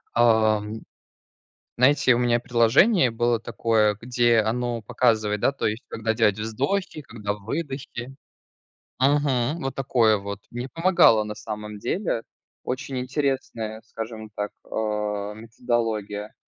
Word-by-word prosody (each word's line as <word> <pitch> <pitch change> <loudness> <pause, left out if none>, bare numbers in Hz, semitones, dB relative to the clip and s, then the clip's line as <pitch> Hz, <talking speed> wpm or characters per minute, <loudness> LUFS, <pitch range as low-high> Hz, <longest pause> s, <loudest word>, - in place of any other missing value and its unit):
Ам, 110 -2 +3 1.0
знаете, 130 0 +5
у - - +1
меня 120 -1 +2
приложение 125 - +4
было 120 0 +1
такое, 110 -2 +1
где 120 -1 +2
оно 115 +1 -1
показывает, 110 -2 +1
да, - - +3
то 140 - -4
есть 110 +3 -3
когда 110 0 -1
делать 110 -3 +2
вздохи, 140 - -2
когда 105 -7 -4
выдохи. 135 +2 -5 0.8
Мгм, 140 +2 +1
вот 135 - -3
такое 120 -5 +3
вот 100 0 -6
мне 120 +2 -5
помогало, 165 - +4
на 105 0 -5
самом 105 -1 -7
деле, 120 - -2 0.4
очень 130 +1 -3
интересная, 125 -5 -2
скажем 110 -1 -7
так, 105 0 -3 0.2
а, 105 -1 -2
методология. 110 -2 -3
115 Hz, 120 wpm, -24 LUFS, 110-130 Hz, 1.0 s, знаете